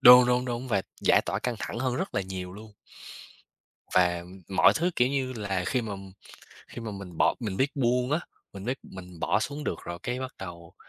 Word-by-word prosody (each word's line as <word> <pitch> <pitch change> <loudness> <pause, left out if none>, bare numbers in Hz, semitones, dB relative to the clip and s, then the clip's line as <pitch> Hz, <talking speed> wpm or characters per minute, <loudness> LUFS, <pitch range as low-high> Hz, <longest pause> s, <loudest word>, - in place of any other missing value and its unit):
đúng, 125 0 +10
đúng, 125 0 +2
đúng, 125 +1 -3
và 100 -4 +2 0.2
giải - - +5
tỏa 95 - -1
căng 120 +2 -1
thẳng - - -4
hơn 125 0 0
rất 190 +2 -3
là - - +2
nhiều 95 -1 -5
luôn. 105 +2 -11 1.2
Và, 90 -1 +4
ừm, 90 +2 -11
mọi 95 - +6
thứ, 175 +3 +2
kiểu 125 +1 +4
như 135 -2 -1
là, 100 -5 -2
khi 125 -2 +1
mà 105 -2 -4 0.8
khi 120 - -8
mà 115 - -4
mình 95 -4 -8
bỏ - - +4
mình 105 -5 -2
biết 135 +2 +2
buông 125 0 +2
á, 155 +3 +2 0.3
mình 100 -1 -8
biết 130 +4 -1
mình 90 -2 -11
bỏ - - +2
xuống 145 +6 -3
được - - -1
rồi, 85 0 -5
cái 125 +1 -2
bắt 130 0 -4
đầu 85 -3 -8
115 Hz, 220 wpm, -28 LUFS, 95-125 Hz, 1.2 s, đúng